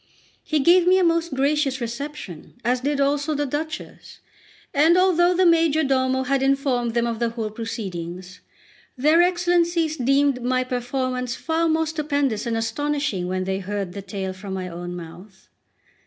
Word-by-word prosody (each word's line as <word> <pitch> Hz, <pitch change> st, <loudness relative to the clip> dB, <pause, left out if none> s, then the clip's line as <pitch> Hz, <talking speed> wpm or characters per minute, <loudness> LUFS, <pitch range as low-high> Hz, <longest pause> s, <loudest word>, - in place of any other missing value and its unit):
He 310 Hz, -, 0 dB
gave 345 Hz, +4 st, +5 dB
me 370 Hz, +1 st, +6 dB
a 375 Hz, -, +3 dB
most 335 Hz, -3 st, +1 dB
gracious 275 Hz, -1 st, +1 dB
reception, 235 Hz, -, -7 dB
as 250 Hz, +1 st, +1 dB
did 285 Hz, +1 st, -1 dB
also 290 Hz, +2 st, +1 dB
the 290 Hz, 0 st, 0 dB
Duchess; 305 Hz, +3 st, -6 dB, 0.5 s
and 320 Hz, +5 st, +4 dB
although 360 Hz, -1 st, +4 dB
the 370 Hz, +1 st, +3 dB
majordomo 280 Hz, -6 st, +2 dB
had 270 Hz, +1 st, 0 dB
informed 270 Hz, -4 st, +1 dB
them 235 Hz, 0 st, +2 dB
of 230 Hz, -1 st, -3 dB
the 235 Hz, -1 st, +1 dB
whole 225 Hz, -2 st, -4 dB
proceedings, 185 Hz, -5 st, -6 dB, 0.6 s
their 305 Hz, +6 st, +4 dB
Excellencies 345 Hz, -2 st, +1 dB
deemed 275 Hz, +1 st, +2 dB
my 255 Hz, +1 st, +1 dB
performance 250 Hz, 0 st, -2 dB
far 330 Hz, 0 st, 0 dB
more 320 Hz, 0 st, +2 dB
stupendous 285 Hz, -7 st, -1 dB
and 230 Hz, -1 st, -1 dB
astonishing 235 Hz, -3 st, -1 dB
when 185 Hz, 0 st, -2 dB
they 190 Hz, +1 st, -2 dB
heard 195 Hz, -1 st, -4 dB
the 200 Hz, -, -6 dB
tale 190 Hz, -1 st, -5 dB
from 190 Hz, +1 st, -7 dB
my 185 Hz, -1 st, -4 dB
own 175 Hz, 0 st, -6 dB
mouth. 180 Hz, +3 st, -12 dB
265 Hz, 155 wpm, -23 LUFS, 220-310 Hz, 0.6 s, me